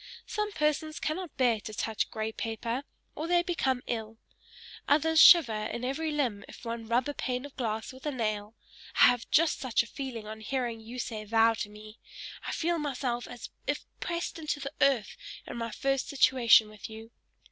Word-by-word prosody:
Some 420 0 -2
persons 305 0 0
cannot 345 +2 -3
bear 240 -4 +3
to 215 +1 -8
touch 220 0 -1
grey 220 0 -3
paper, 230 +4 -3 0.3
or 315 - -4
they 350 0 +3
become 265 -8 0
ill; 225 -2 -4 0.7
others 320 +2 +4
shiver 325 -11 +9
in 235 +2 -4
every 305 +5 -1
limb 255 -9 -1
if - - -12
one 230 -1 -4
rub 240 +3 +2
a 290 - -2
pane 250 -1 -3
of 285 - -11
glass 220 -2 -3
with 260 +3 -8
a - - 0
nail: 215 -3 -2 0.4
I - - +10
have 245 -2 -1
just 325 0 +3
such 255 -4 +1
a - - -11
feeling 245 -3 -6
on 220 +1 -8
hearing 240 -1 -2
you 230 +3 -9
say 225 -3 -4
thou 225 +1 +4
to 215 -2 -4
me; 215 +1 -13 0.5
I - - -1
feel 340 0 0
myself 250 -4 -2
as 245 - -9 0.2
if - - -1
pressed 340 0 -3
to 305 -2 -2
the 275 +1 -5
earth 265 -6 +3 0.3
in - - -7
my 230 0 -3
first 270 +4 -1
situation 250 -5 +5
with 215 0 -9
you. 220 +1 -10
245 Hz, 190 wpm, -29 LUFS, 225-290 Hz, 0.7 s, I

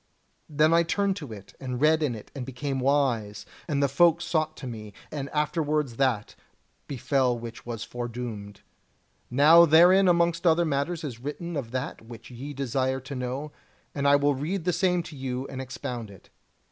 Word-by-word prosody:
Then 155 +2 +3
I 170 - +6
turned 195 +3 0
to 145 - -8
it, 100 -3 -11
and 125 -2 -4
read 155 +2 +4
in 140 -6 0
it, 105 - -11
and 135 - -4
became 135 +2 -4
wise, 125 -7 0 0.2
and 145 -3 0
the - - +4
folk 170 +3 +4
sought 155 -2 -1
to - - -8
me, 110 -4 -7 0.2
and 140 -2 -4
afterwards 150 -4 -1
that 125 -6 0 0.5
befell 130 -2 0
which 115 0 -9
was 115 -2 -4
foredoomed. 120 -4 -6 0.7
Now 155 +6 +7
herein 180 +5 +6
amongst 170 0 +2
other 170 +1 +4
matters 155 +3 -1
is 125 -6 -6
written 155 +6 -5
of 135 -6 -3
that 130 +4 -4
which 115 +1 -12
ye 130 +4 -7
desire 130 -1 -1
to 135 +2 -8
know, 130 +4 -4 0.4
and 140 -1 0
I 140 - +6
will 145 0 +3
read 160 +7 -3
the 180 +1 +1
same 180 0 +1
to 160 -2 -10
you 130 -1 -4
and 130 - -5
expound 125 -3 -6
it. 100 -2 -16
140 Hz, 180 wpm, -26 LUFS, 125-160 Hz, 0.7 s, Now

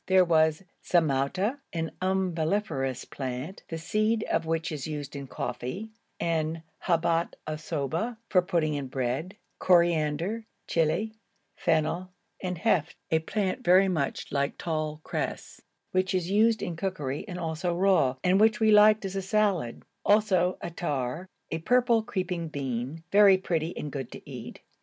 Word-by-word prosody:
There 185 -1 +5
was 160 0 +3 0.2
zamouta, 175 - +1
an 165 -1 -2
umbelliferous 175 -6 0
plant, 130 +6 -5
the 165 - -3
seed 215 +6 +1
of 165 - 0
which 165 0 -1
is 150 -3 -4
used 150 -2 -5
in 140 -1 -6
coffee, 190 - -5 0.3
and 160 -1 -1 0.2
habat 170 0 +1
assoba 155 - -3
for 185 - +4
putting 170 -4 0
in 140 -2 -3
bread; 130 +9 -3 0.2
coriander, 170 +4 +2 0.2
chili, 170 +7 +1 0.4
fennel, 165 +3 0 0.3
and 180 -1 -3
helf, 180 -6 +1 0.2
a 160 - +4
plant 200 +7 -2
very 190 0 +6
like 140 -4 -1
tall 155 -2 -3
cress, - - -4 0.3
which 185 +1 +1
is 180 0 -1
used 220 +1 +3
in 175 -4 -3
cookery 160 -6 -3
and 180 -3 -5
also 165 +1 -2
raw, 180 -8 +3
and 185 +2 +4
which 220 0 +4
we 220 -1 +4
liked 210 0 +6
as 195 0 -4
a 195 - 0
salad; 195 - 0 0.2
also 190 -4 +3
attar, 165 -1 -3 0.2
a 160 - -1
purple 240 +4 +3
creeping 180 -5 -3
bean, 135 +1 -4
very 200 -1 +7
pretty 170 -3 -2
and 150 - -4
good 135 -3 -5
to - - -11
eat. - - -8
170 Hz, 145 wpm, -28 LUFS, 155-195 Hz, 0.4 s, very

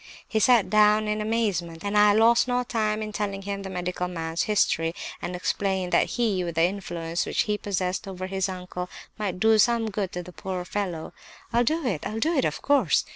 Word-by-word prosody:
"He 220 - 0
sat 235 0 +5
down 215 0 +4
in 210 0 -1
amazement, 200 -7 -1
and 200 +1 -2
I 210 0 +6
lost 230 +3 +5
no 250 0 +1
time 220 -3 -1
in 215 - -5
telling 200 -2 -3
him 200 0 -4
the 195 - -6
medical 180 0 -3
man's 165 -1 -3
history; 165 -5 +1 0.3
and 180 - -4
explained 190 0 -1
that - - +3
he, 210 -6 +1
with 170 -2 -4
the 165 - +3
influence 175 -3 -2
which - - +1
he 210 - 0
possessed 195 0 -2
over 185 -1 -5
his 190 0 -1
uncle, 180 -1 -6 0.3
might 190 -4 -2
do 220 +1 +4
some 230 0 +3
good 195 -2 -2
to 180 - -4
the 180 +1 -12
poor 185 -2 -5
fellow. 180 -5 -4 0.4
"'I'll 240 +1 +4
do 315 +3 0
it—I'll 210 0 -2
do 320 +8 +1
it, 270 - +2
of - - -3
course! 285 0 +3
200 Hz, 205 wpm, -26 LUFS, 180-215 Hz, 0.4 s, I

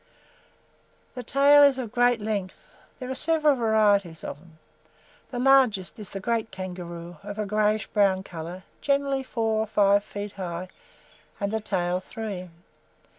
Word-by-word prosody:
The 250 - -6
tail 280 +4 +5
is 280 -2 +6
of 240 -5 -5
great 245 0 +3
strength. 205 -3 -3 0.4
There 255 -1 -6
are - - 0
several 305 0 +2
varieties 205 -7 +2
of 145 - -6
them. 165 -1 -20 0.7
The 250 - -6
largest 250 -8 +3
is 210 - -7
the 195 - -6
Great 225 +2 -1
Kangaroo, 175 -2 -7
of 205 +1 -8
a 215 - -1
greyish 210 +1 +1
brown 195 -3 +2
colour, 175 +1 -8 0.2
generally 280 -1 +1
four 225 -4 -1
or 220 - -1
five 200 -1 +3
feet 205 0 -6
high 180 -2 -6 0.7
and 200 0 -1
the 220 - +1
tail 180 -4 -1
three. 190 -2 -6
210 Hz, 150 wpm, -26 LUFS, 185-245 Hz, 0.7 s, is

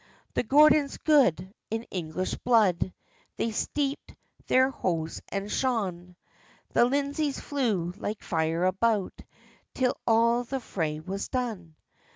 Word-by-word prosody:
The - - +1
Gordons 300 0 +5
good, 195 - +3 0.2
in 225 +1 -2
English 180 0 -3
blood, 210 -7 +2 0.5
They 230 - -1
steepd 280 +5 -2 0.3
their 260 +1 +4
hose 165 -9 -2
and 200 +1 -3
shoon; 185 -9 -1 0.6
The - - +5
Lindesays 285 +2 -1
flew 220 -12 -1
like 210 0 -5
fire 165 +1 0
about, 200 +2 0 0.5
Till 255 -1 +1
all 235 +1 +4
the 265 +2 -4
fray 160 -10 -3
was 190 +5 -5
done. 215 -11 -4
220 Hz, 120 wpm, -27 LUFS, 180-260 Hz, 0.6 s, Gordons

